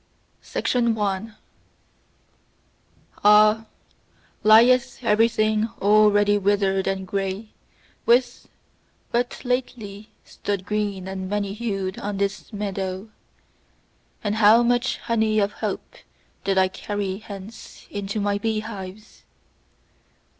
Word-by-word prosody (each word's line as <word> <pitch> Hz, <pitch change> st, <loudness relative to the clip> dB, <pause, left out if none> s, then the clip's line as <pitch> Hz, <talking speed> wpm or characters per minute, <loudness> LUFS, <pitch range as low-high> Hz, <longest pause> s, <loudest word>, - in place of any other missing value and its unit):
1. 210 Hz, +1 st, -2 dB, 1.9 s
Ah, 210 Hz, +1 st, +6 dB, 0.8 s
lieth 240 Hz, +4 st, +5 dB
everything 215 Hz, 0 st, +2 dB
already 205 Hz, 0 st, +4 dB
withered 195 Hz, -1 st, +1 dB
and 195 Hz, 0 st, -2 dB
grey 195 Hz, +2 st, -3 dB, 0.6 s
which 245 Hz, +1 st, +2 dB, 0.7 s
but 245 Hz, +2 st, -2 dB
lately 220 Hz, -5 st, -3 dB, 0.2 s
stood 200 Hz, -2 st, -4 dB
green 205 Hz, -3 st, -2 dB
and 190 Hz, -1 st, -5 dB
many 200 Hz, -1 st, -2 dB
hued 195 Hz, -4 st, -3 dB
on 205 Hz, -1 st, -4 dB
this 200 Hz, +3 st, -3 dB
meadow! 195 Hz, -1 st, -4 dB, 1.1 s
And 210 Hz, 0 st, -1 dB
how 220 Hz, +2 st, +6 dB
much 245 Hz, +1 st, +1 dB
honey 220 Hz, -2 st, 0 dB
of 205 Hz, -1 st, +2 dB
hope -, -, -5 dB, 0.5 s
did 195 Hz, -1 st, 0 dB
I 190 Hz, 0 st, +5 dB
carry 195 Hz, 0 st, -4 dB
hence 205 Hz, 0 st, -11 dB
into 205 Hz, +1 st, -3 dB
my 205 Hz, 0 st, 0 dB
beehives! 215 Hz, -2 st, -5 dB
205 Hz, 95 wpm, -23 LUFS, 195-220 Hz, 1.9 s, Ah